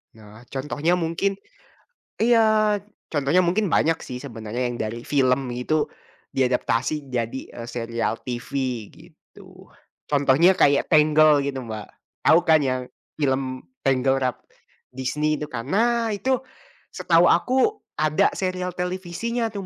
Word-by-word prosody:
Nah, 110 0 -15
contohnya 150 +5 -1
mungkin. 180 +4 -1 0.9
iya, 215 -2 +4 0.3
contohnya 145 +4 +2
mungkin 185 +5 +1
banyak 165 0 +2
sih 125 - -6
sebenarnya 115 -2 -6
yang 120 - -5
dari 110 +2 -4
film 130 -1 +1
itu 150 +6 -1 0.4
di 135 -1 +1
adaptasi 130 +3 -1
jadi, 120 +1 -2
eee, 115 - -8
serial 115 -1 -2
TV, 120 -1 -5 0.4
gitu. - - -17 0.4
Contohnya 145 +5 +4
kayak 140 0 +4
Tangled 155 -1 +5
gitu 135 -2 -3
Mbak, 110 -2 -6 0.4
tahu 160 - +7
kan 160 -2 +5
yang 130 -2 0 0.4
film 130 -2 -1 0.2
Tangled 135 0 +2
Ralph 125 -2 -1 0.5
Disney 150 +4 -1
itu 150 - -4
kan? 115 -3 -5
Nah, 230 +2 +1
itu 255 +6 0 0.6
setahu - - +3
aku 265 +12 +2 0.2
ada 155 0 +3
serial 185 -1 -2
televisinya 190 +6 -2
tuh, 200 -2 -5
145 Hz, 130 wpm, -23 LUFS, 125-180 Hz, 0.9 s, tahu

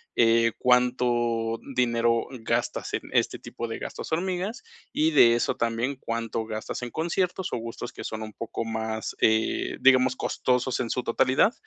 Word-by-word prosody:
eh, 115 0 +4
cuánto 120 -2 +2 0.2
dinero 115 -2 +2
gastas - - -1
en - - 0
este - - +1
tipo 115 - -6
de 115 - -5
gastos - - -6
hormiga, 180 +4 -1 0.4
y 155 +1 +3
de 120 -6 +7
eso 120 - 0
también 115 +4 -1
cuánto 115 -1 -3
gastas 110 +2 -5
en 120 - -5
conciertos 175 +3 0 0.2
o - - 0
gustos 115 0 -6
que - - -8
son 110 0 -5
un 110 0 -8
poco 115 +1 -5
más, 110 0 -3
eh, 110 0 +2
digamos, 130 -1 +5
costosos 125 0 0
en 120 - -3
su 125 - -1
totalidad. 130 - +3
120 Hz, 160 wpm, -26 LUFS, 115-130 Hz, 0.4 s, de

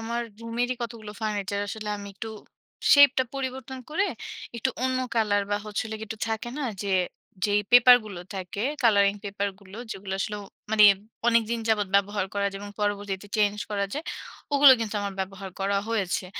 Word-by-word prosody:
আমার 235 +1 -2 0.2
রুমেরই 235 +2 -1
কতগুলো 225 -3 -6
ফার্নিচার 205 -2 -2
আসলে 215 +1 -5
আমি 200 0 -8
একটু 225 +3 -6 0.7
শেপ 285 -1 +9
টা 260 - +3
পরিবর্তন 265 -1 -4
করে 385 +6 +1 0.5
একটু 235 +3 0
অন্য 260 0 +1 0.2
কালার 210 -3 +2
বা 205 - +2
হচ্ছে 210 0 -2
হল 220 - -6
গিয়ে 220 - -7
একটু 220 - -6
থাকে 225 +2 -2
না? - - -2 0.2
যে, 200 - -4 0.6
যেই 205 0 +3
পেপার 245 0 +9
গুলো 200 -5 -7
থাকে, 190 +2 -4 0.2
কালারিং 200 -4 +5
পেপার 200 0 -2
গুলো, 195 0 -13
যেগুলো 195 -1 -6
আসলে 210 - -2 0.3
মানে 215 -1 +6 0.4
অনেকদিন 230 0 +3
যাবৎ 210 -2 +2
ব্যবহার 200 0 +2
করা 200 0 +1
যায় 195 - -7
এবং 205 - -7
পরবর্তীতে 205 -1 -2
চেঞ্জ 210 -1 +2
করা 200 -1 0
যায় 300 +3 -4 0.5
ওগুলো 285 -1 +9
কিন্তু 220 -1 -3
আমার 200 -1 -3
ব্যবহার 190 0 -5
করা 200 +1 +1
হয়েছে। 200 -5 -1
210 Hz, 175 wpm, -26 LUFS, 200-235 Hz, 0.7 s, শেপ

